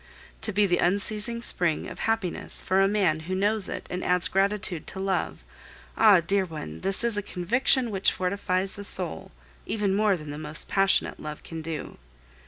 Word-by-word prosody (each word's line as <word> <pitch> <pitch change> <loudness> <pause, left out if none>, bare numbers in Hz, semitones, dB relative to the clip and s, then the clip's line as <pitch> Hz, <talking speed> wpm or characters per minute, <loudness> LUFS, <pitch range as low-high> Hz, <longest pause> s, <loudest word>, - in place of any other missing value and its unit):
To 220 - +1
be 205 +1 +3
the 175 -2 +1
unceasing 210 +5 -1
spring 175 -8 -1
of - - -9
happiness 225 -5 -1
for 190 +1 +2
a 195 - +5
man 195 -6 +2
who 185 - 0
knows 205 +1 +2
it - - -5
and 180 - -4
adds 180 -1 +2
gratitude 195 -3 0
to 190 - -6
love, 190 -1 -2 0.5
ah! 205 -5 +6
dear 195 +4 +1
one, 150 - -7
this 195 +3 0
is 230 -3 +1
a - - -2
conviction 235 +7 +1
which 195 -1 +2
fortifies 185 0 -1
the 205 - -8
soul, 185 -4 -3 0.4
even 205 -3 0
more 205 -1 +3
than 150 -2 -8
the 145 - -6
most 150 0 +1
passionate 195 0 +2
love 150 0 -7
can 165 -1 -7
do. 160 -1 -6
195 Hz, 185 wpm, -26 LUFS, 175-205 Hz, 0.5 s, ah